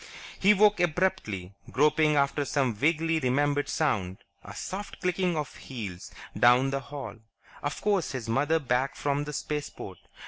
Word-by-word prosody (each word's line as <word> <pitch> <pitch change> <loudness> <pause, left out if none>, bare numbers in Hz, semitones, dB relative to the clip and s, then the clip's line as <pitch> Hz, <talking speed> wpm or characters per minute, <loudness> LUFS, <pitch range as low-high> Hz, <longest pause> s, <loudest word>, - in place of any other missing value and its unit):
He 205 +2 +5
woke 210 0 +4
abruptly, 150 - -1 0.2
groping 150 +5 +3
after 140 +1 +2
some 135 -4 0
vaguely 160 +7 +1
remembered 145 +2 +1
sound. 100 - 0 0.3
A 100 - -10
soft 195 - -6
clicking 180 -2 0
of 150 - -4
heels 105 -9 -7 0.3
down 125 +3 +5
the 135 - -1
hall.... 135 -3 -8 0.4
Of 145 0 -4
course, 200 -8 +1
his 125 -4 -5
mother 145 +8 +2
back 130 -2 0
from 145 0 -1
the 150 - -6
Spaceport! 150 +1 -5
145 Hz, 145 wpm, -28 LUFS, 125-160 Hz, 0.4 s, He